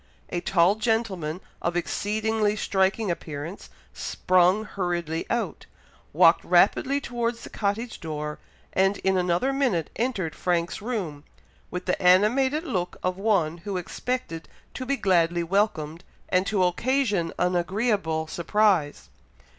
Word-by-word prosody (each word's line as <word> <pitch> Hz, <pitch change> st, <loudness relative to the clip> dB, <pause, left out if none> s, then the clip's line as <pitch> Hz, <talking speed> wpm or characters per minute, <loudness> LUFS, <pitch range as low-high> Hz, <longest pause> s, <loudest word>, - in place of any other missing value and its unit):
A 175 Hz, -, -2 dB
tall 180 Hz, +1 st, +4 dB
gentleman, 205 Hz, -7 st, -1 dB, 0.2 s
of 170 Hz, 0 st, -1 dB
exceedingly 215 Hz, +3 st, 0 dB
striking 195 Hz, 0 st, +1 dB
appearance, 160 Hz, +2 st, -6 dB, 0.2 s
sprung 185 Hz, +3 st, +2 dB
hurriedly 175 Hz, -5 st, -3 dB
out, 235 Hz, -, -2 dB, 0.4 s
walked -, -, +5 dB
rapidly 280 Hz, 0 st, +3 dB
towards 235 Hz, -3 st, -3 dB
the -, -, -9 dB
cottage 215 Hz, +3 st, -2 dB
door, 150 Hz, -2 st, -5 dB, 0.3 s
and 195 Hz, +1 st, +2 dB
in 190 Hz, 0 st, +2 dB
another 180 Hz, +8 st, +1 dB
minute 245 Hz, -, 0 dB
entered 215 Hz, -9 st, -1 dB
Frank's 175 Hz, +1 st, -1 dB
room, 190 Hz, -11 st, -4 dB, 0.5 s
with 180 Hz, 0 st, -5 dB
the 180 Hz, -, -1 dB
animated 245 Hz, -, +4 dB
look 180 Hz, -, -3 dB
of 185 Hz, +1 st, -1 dB
one 175 Hz, -6 st, +1 dB
who 190 Hz, +2 st, -4 dB
expected 180 Hz, -1 st, -4 dB, 0.2 s
to 255 Hz, -, -6 dB
be 275 Hz, +1 st, +1 dB
gladly 175 Hz, -4 st, +2 dB
welcomed, 170 Hz, -3 st, 0 dB, 0.3 s
and 185 Hz, +1 st, +2 dB
to 200 Hz, -4 st, +2 dB
occasion 205 Hz, -2 st, +1 dB
an 180 Hz, 0 st, +1 dB
agreeable 180 Hz, -3 st, 0 dB
surprise. 175 Hz, -2 st, +1 dB
190 Hz, 125 wpm, -25 LUFS, 170-220 Hz, 0.5 s, walked